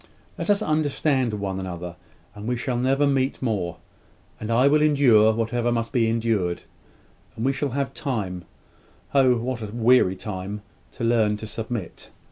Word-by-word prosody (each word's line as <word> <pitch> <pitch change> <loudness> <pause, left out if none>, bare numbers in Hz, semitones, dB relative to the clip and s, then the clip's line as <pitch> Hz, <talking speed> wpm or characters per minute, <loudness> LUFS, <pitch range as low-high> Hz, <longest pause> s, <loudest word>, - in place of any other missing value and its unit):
Let - - -5
us 205 0 +4
once 215 - -3
understand 145 -5 +1
one 100 -2 -3
another, 90 -2 -6 0.4
and 105 +1 -8
we 125 0 0
will 125 -2 0
never 135 +3 +2
meet 135 -1 +1
more, 95 -9 -2 0.6
and 110 - -5
I 125 +4 +4
will 150 +1 +4
endure 130 -8 +5
whatever 115 +2 -1
must 115 -1 -1
be 115 -4 +2
endured, 110 -6 0 0.7
and 115 - -3
we 135 - +2
shall 140 +1 -2
have 135 -1 -1
time 95 - -3 0.7
Oh, 130 -3 +5
what 120 +1 -3
a 110 - -4
weary 115 -3 +3
time! 100 +1 -6 0.3
to 125 - -7
learn 110 -3 +2
to 110 - -7
submit. 110 -2 -6
115 Hz, 165 wpm, -24 LUFS, 105-130 Hz, 0.7 s, endure